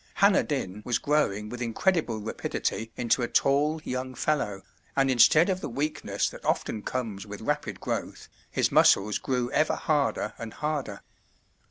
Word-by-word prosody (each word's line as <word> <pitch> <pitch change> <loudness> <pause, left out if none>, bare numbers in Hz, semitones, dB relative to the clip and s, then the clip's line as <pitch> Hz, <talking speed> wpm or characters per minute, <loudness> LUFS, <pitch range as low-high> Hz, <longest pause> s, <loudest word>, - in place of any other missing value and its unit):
Hanner 200 -1 +5
Dyn 105 -9 -3
was 120 -2 +1
growing 125 -9 0
with 120 +3 -7
incredible 120 +2 0
rapidity 110 +1 -3
into 120 +1 +1
a 120 - 0
tall 145 +5 +2
young 130 -1 -4
fellow, 115 -10 -1 0.3
and 135 -1 +3
instead 155 +6 +6
of 185 -1 -1
the - - -4
weakness 145 +5 -1
that - - -12
often 110 - -1
comes 105 -4 -4
with 105 0 -7
rapid 150 +6 -2
growth, - - -4 0.2
his - - +1
muscles 105 +2 +4
grew 125 -1 -1
ever 155 - +2
harder 140 -8 0
and 115 -1 -7
harder. 150 -2 -3
130 Hz, 155 wpm, -27 LUFS, 110-150 Hz, 0.3 s, instead